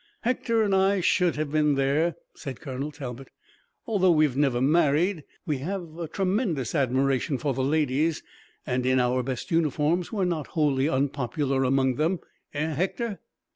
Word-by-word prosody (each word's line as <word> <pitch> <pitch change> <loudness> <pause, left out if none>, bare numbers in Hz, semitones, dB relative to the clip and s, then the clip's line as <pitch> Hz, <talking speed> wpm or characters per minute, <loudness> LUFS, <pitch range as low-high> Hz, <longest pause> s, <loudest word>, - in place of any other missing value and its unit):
"Hector 230 -2 +1
and 200 -2 +1
I 195 +1 +3
should 180 -1 +2
have 150 -1 -3
been 150 -1 +3
there," 140 +5 +1 0.2
said 135 -6 -7
Colonel 140 +1 -5
Talbot. 135 -3 -7 0.6
"Although 195 -5 +2
we've 155 -5 +3
never 135 -4 +2
married, 155 +4 +2 0.2
we 150 -6 -1
have 170 +1 -5
a 170 - -3
tremendous 185 - -1
admiration 135 0 +1
for 140 +1 -1
the 130 - -2
ladies, 150 +2 +1 0.4
and 125 -2 -1
in 130 0 +3
our 125 +1 +2
best 130 +8 -5
uniforms 165 +1 +1
we're 200 -4 0
not 165 -5 -2
wholly 145 -2 +2
unpopular 135 0 0
among 130 -1 +2
them, 165 +4 +1 0.4
eh, 155 +2 -1
Hector?" 195 - -2
150 Hz, 155 wpm, -26 LUFS, 135-175 Hz, 0.6 s, I